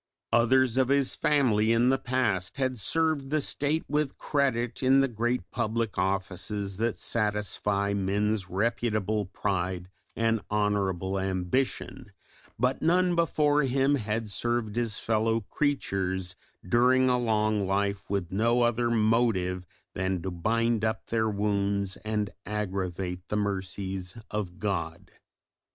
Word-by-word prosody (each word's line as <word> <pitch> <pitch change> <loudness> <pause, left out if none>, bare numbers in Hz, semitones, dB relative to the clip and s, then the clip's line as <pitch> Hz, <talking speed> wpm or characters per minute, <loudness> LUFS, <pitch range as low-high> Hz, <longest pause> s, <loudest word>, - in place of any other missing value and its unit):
Others 125 +1 +4
of 130 -1 +4
his 140 -1 +2
family 115 -7 +2
in 120 +2 +4
the 135 0 +2
past 120 -8 -1
had 130 -3 -1
served 155 +2 +1
the 155 +1 +1
State 145 +2 0
with 150 -1 -1
credit 125 -4 0
in 135 +1 +5
the 135 - +4
great 120 +1 -2
public 115 -2 -1
offices 95 +1 -2
that 115 +1 0
satisfy 105 -2 -1
men's 100 0 0
reputable 110 0 0
pride 95 -2 -2 0.2
and 115 -1 +1
honourable 100 -3 0
ambition, 95 +7 -2 0.5
but 125 +3 0
none 180 +2 +3
before 150 -3 +2
him 135 +1 +2
had 110 -3 -1
served 115 0 -1
his 115 -3 -1
fellow 115 0 +1
creatures 95 -8 -1 0.3
during 125 +4 +4
a 125 -1 +3
long 110 -3 +1
life 100 +1 -1
with 95 -3 -2
no 115 +5 +2
other 120 0 +1
motive 110 -6 +1 0.3
than 95 0 -1
to 95 - -3
bind 115 +5 0
up 110 0 -1
their 110 -1 +2
wounds 100 -1 0
and 105 -1 -2
aggravate 95 -3 -3
the 105 - -1
mercies 95 -1 -3
of 95 -4 -3
God. 85 -5 -3
110 Hz, 130 wpm, -28 LUFS, 100-120 Hz, 0.5 s, in